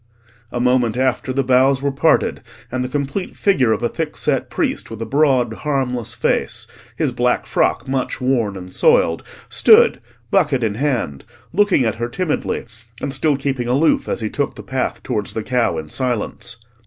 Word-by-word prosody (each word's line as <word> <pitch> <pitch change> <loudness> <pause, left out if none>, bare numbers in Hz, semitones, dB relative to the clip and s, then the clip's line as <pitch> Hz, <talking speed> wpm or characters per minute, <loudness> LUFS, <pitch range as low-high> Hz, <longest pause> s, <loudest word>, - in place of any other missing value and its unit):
A 120 - -3
moment 125 -2 +2
after, 130 0 0
the 135 +1 0
boughs 130 +1 +4
were 140 - +1
parted, 150 +4 +2 0.3
and 130 0 -1
the 125 - -4
complete 140 +6 -3
figure 135 - +2
of 110 - 0
a - - +3
thickset 160 +4 -1
priest - - -1
with 115 - -8
a 115 - -3
broad, 135 -5 +2
harmless 125 -4 -2
face, - - -1 0.3
his - - 0
black - - 0
frock - - 0
much 130 -1 -2
worn 125 -6 0
and 90 0 -9
soiled, 80 0 +3 0.3
stood, - - +5 0.3
bucket 140 -7 +2
in 110 -2 0
hand, 120 - -1 0.3
looking 195 -8 +3
at 110 - +1
her 120 - -1
timidly, 155 +1 -2 0.3
and 135 - -3
still 150 -2 +1
keeping 135 -3 -2
aloof 140 +6 +2
as - - -1
he 110 - -2
took 145 -1 -2
the - - -9
path 130 -1 -3
towards 105 -5 -2
the 110 - -2
cow 125 -9 +1
in 80 -1 -5
silence. 120 - -3
130 Hz, 175 wpm, -19 LUFS, 120-140 Hz, 0.3 s, stood